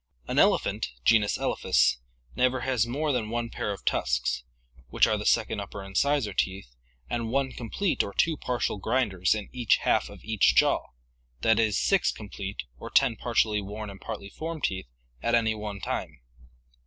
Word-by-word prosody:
An - - +1
elephant - - +2
(genus 105 -3 +4
Elephas) - - +2 0.4
never 130 0 +2
has 125 -3 +1
more 145 +5 -1
than 120 -5 -1
one 115 0 -2
pair 105 - -3
of 100 - -7
tusks, 60 0 0 0.5
which - - +4
are - - +1
the - - -3
second - - +2
upper 100 - -6
incisor 110 +3 +1
teeth, 95 -11 -2 0.3
and 115 -1 -2
one 135 +2 0
complete 145 - -1
or 100 - -4
two 165 +9 +2
partial 120 -6 -2
grinders 105 -5 +1
in 105 -2 -5
each 120 -4 +3
half - - +2
of - - -13
each 110 -2 +3
jaw, - - +3 0.5
that 110 +6 +4
is, 110 -3 +2
six 195 -2 +3
complete 100 -1 -6 0.2
or - - -7
ten 115 - +3
partially 110 -3 +1
worn 105 +1 -6
and 95 - -13
partly 100 -3 -6
formed 160 +7 -6
teeth 95 -6 -1 0.3
at 120 - +2
any 110 -1 +2
one 105 -2 -6
time. - - -4
110 Hz, 170 wpm, -27 LUFS, 100-125 Hz, 0.5 s, genus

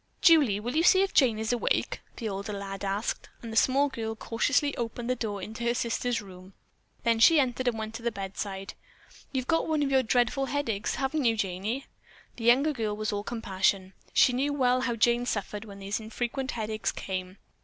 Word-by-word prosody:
"Julie, 290 - +5
will 240 +5 -4
you 320 - +4
see 375 +2 +6
if 390 - -2
Jane 245 -6 +4
is 220 +2 -1
awake?" 240 - 0 0.2
the 230 - -3
older 200 +1 -4
lad 195 0 -6
asked, 200 +3 -2
and 230 -1 -6
the - - -5
small 270 +6 +4
girl 225 -5 -4
cautiously 280 +6 0
opened 235 +1 -3
the - - +1
door 205 -5 -4
into 220 +4 -6
her 235 0 +2
sister's 235 -1 -1
room. 185 0 -13 0.5
Then 230 -1 +2
she 320 +7 +7
entered 255 -1 0
and 235 -2 +1
went 220 0 -5
to 225 - -7
the 235 0 -1
bedside. 195 -1 -5 0.6
"You've 260 -2 -2
got 325 +4 +1
one 310 -2 +1
of 275 - -1
your 265 -1 +5
dreadful 250 +3 +1
headaches, 240 -6 -1
haven't 275 +1 -1
you, 225 -1 +3
Janey?" 205 +7 -2 0.5
The 230 - -5
younger 270 +6 +5
girl 215 -5 -2
was 215 0 -2
all 205 - -1
compassion. 195 -4 -1 0.2
She 250 - +5
knew 275 +4 0
well 255 -2 +2
how 245 -2 -1
Jane 240 +2 +2
suffered 210 0 -3
when 200 -2 -10
these 200 +2 -3
infrequent 240 +4 -3
headaches 220 -1 -2
came. 185 0 -5
230 Hz, 200 wpm, -28 LUFS, 205-260 Hz, 0.6 s, she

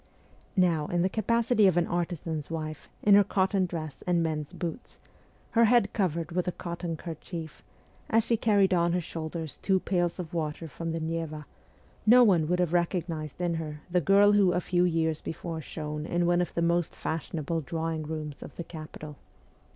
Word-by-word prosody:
Now, 165 -5 +3
in 175 0 +1
the 185 - +2
capacity 230 0 +3
of 180 -2 +3
an 175 - +3
artisan's 170 -3 -3
wife, 155 -2 -5
in 205 - +6
her 205 0 +8
cotton 190 -1 +1
dress 155 -5 -6
and 175 -1 +3
men's 155 -2 -2
boots, 170 +6 -6 0.5
her 230 0 +5
head 225 -3 +3
covered 170 -5 -1
with 180 +1 -1
a - - +1
cotton 170 -1 -5
kerchief, 165 0 -7 0.5
as 225 0 +4
she 235 - +2
carried 205 -4 +3
on 170 -1 +2
her 180 - +2
shoulders 160 -2 -5
her - - -33
two 190 -1 +2
pails 175 -2 0
of 175 -3 -6
water 160 0 -3
from 165 +2 -5
the 165 - -2
Neva, 160 -1 -3 0.6
no 245 +3 +8
one 175 -8 +4
would 180 +2 +1
have 175 -2 0
recognized 170 -4 -1
in 175 -1 0
her 155 -2 -5
the 180 0 +3
girl 200 +5 +6
who 200 -3 +4
a 175 - +2
few 180 0 +1
years 160 -2 0
before 165 0 -5
shone 150 0 -5
in 175 0 +1
one 175 0 +3
of 175 - -3
the 170 - +1
most 170 0 +1
fashionable 160 0 -3
drawing 160 +2 -3
rooms 155 -1 -5
of - - -10
the 170 - -5
capital. 155 -2 -9
170 Hz, 190 wpm, -28 LUFS, 160-180 Hz, 0.6 s, her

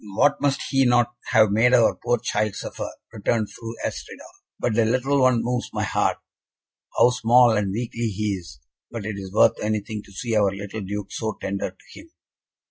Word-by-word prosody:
"What 145 +6 +3
must 140 -1 +1
he 135 -1 +4
not 120 -1 +3
have 110 -3 +4
made 120 +4 +4
our 120 -2 +4
poor 120 0 +2
child 105 -2 -1
suffer!" - - -5 0.2
returned 110 -3 -1
Fru 115 0 -8
Astrida, - - -6 0.4
"but 120 - 0
the 115 +1 +3
little 130 +5 +1
one 130 -3 +3
moves 125 +1 -2
my - - -1
heart. - - 0 0.8
How 125 - +6
small 125 0 +5
and 105 -3 0
weakly 115 +2 -3
he 105 0 -2
is, 85 -10 -9 0.3
but 115 -4 -6
it 105 -1 -4
is 95 -1 -8
worth 110 +2 +4
anything 105 0 -2
to - - -17
see 115 +3 -3
our 105 -2 +4
little 100 +2 -6
Duke 100 +1 -5
so 110 -2 -3
tender 100 0 -3
to 95 - -16
him." 325 - -15
115 Hz, 190 wpm, -23 LUFS, 105-120 Hz, 0.8 s, How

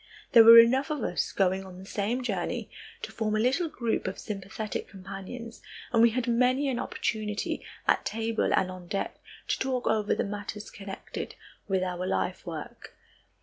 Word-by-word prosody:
There 230 -2 +9
were 230 +1 +11
enough 260 +5 +6
of 300 -6 -2
us - - -1
going 190 0 +1
on 185 -1 -11
the 190 - -10
same 215 +6 -2
journey 195 -7 -2 0.3
to - - -5
form 215 -1 -1
a - - +1
little 270 +9 +2
group 235 -9 -1
of 190 - -3
sympathetic 210 +1 -5
companions 195 +5 -8 0.3
and 230 - +5
we 235 - +7
had 240 +1 -1
many 255 +4 +3
an 245 -2 -1
opportunity 210 -2 -2 0.2
at - - +3
table 225 0 -1
and 185 -1 +2
on 180 -1 -10
deck 195 +2 -3 0.3
to - - +1
talk 260 -2 -1
over 215 -1 +2
the - - 0
matters 205 +1 -6
connected 195 -1 -7 0.3
with 190 -2 +1
our 180 0 -3
life 95 - -2
work. - - -8
215 Hz, 175 wpm, -28 LUFS, 195-235 Hz, 0.3 s, were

